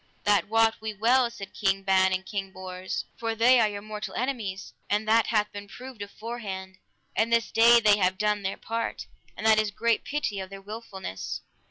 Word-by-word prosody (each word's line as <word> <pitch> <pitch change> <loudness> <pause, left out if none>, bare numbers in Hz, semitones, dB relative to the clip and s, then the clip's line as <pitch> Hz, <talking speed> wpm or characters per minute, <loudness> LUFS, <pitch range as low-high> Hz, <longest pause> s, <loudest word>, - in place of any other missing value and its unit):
That 205 -1 +3
wot 225 0 +3
we 220 -1 -4
well, 240 +4 +3
said 200 -4 -9
King 195 -1 0
Ban 190 -1 +4
and 185 0 -1
King 195 -1 -4
Bors, 185 0 -5
for 225 -1 -2
they 245 +3 +6
are 215 - +4
your 205 -1 -6
mortal 210 -2 -6
enemies, 225 -7 -3 0.2
and 210 +1 0
that 225 +1 +4
hath 210 -2 +1
been 205 0 -8
proved 250 +2 -10
aforehand; 200 -3 -6 0.4
and 225 +1 +1
this 230 -1 +2
day 235 +1 +7
they 210 -2 +5
have 185 0 +2
done 210 0 +1
their 190 0 -3
part, 230 0 -3 0.3
and - - -5
that 220 -1 +6
is 215 -1 +1
great 230 +2 0
pity 285 -9 -2
of 190 0 -6
their 195 0 -9
wilfulness. 195 - -6
210 Hz, 195 wpm, -27 LUFS, 195-230 Hz, 0.4 s, day